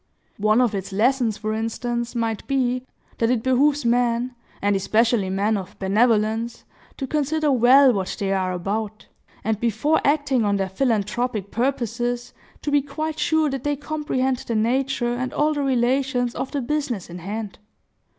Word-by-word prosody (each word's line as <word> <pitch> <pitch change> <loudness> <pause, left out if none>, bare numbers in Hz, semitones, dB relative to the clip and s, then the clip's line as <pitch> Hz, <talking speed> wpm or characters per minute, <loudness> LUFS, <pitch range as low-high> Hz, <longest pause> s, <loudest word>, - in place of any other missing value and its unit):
One 215 +3 +4
of 240 -4 +2
its 195 0 -4
lessons, 230 +1 +2
for 215 0 -3
instance, 235 +2 -3
might 225 -2 -2
be, 255 -2 0 0.3
that 230 - +2
it 240 -3 +1
behooves 275 +2 +2
men, 240 +1 +1 0.3
and 205 0 +1
especially 215 +1 +2
men 205 +3 +1
of 200 +2 -8
benevolence, 220 +3 +1 0.3
to 270 - -3
consider 300 +2 0
well 260 +1 +6
what 195 -3 -2
they 195 -2 0
are 185 -1 0
about, 205 +4 -3 0.4
and, 220 -1 0
before 235 +8 +1
acting 285 -4 +2
on 205 -1 +2
their 195 -1 -1
philanthropic 215 -1 -1
purposes, 245 -1 -1 0.3
to 295 - -1
be 290 0 +4
quite 310 +2 -4
sure 315 0 +2
that 270 -2 -4
they 290 0 0
comprehend 280 -3 -1
the 235 - -4
nature 240 +2 +1
and 255 +1 -3
all 305 +1 +2
the 290 - -2
relations 255 -1 +1
of 260 - -4
the 285 - -2
business 255 - -2
in 175 +1 -8
hand. 205 +3 -5
240 Hz, 160 wpm, -23 LUFS, 215-270 Hz, 0.4 s, well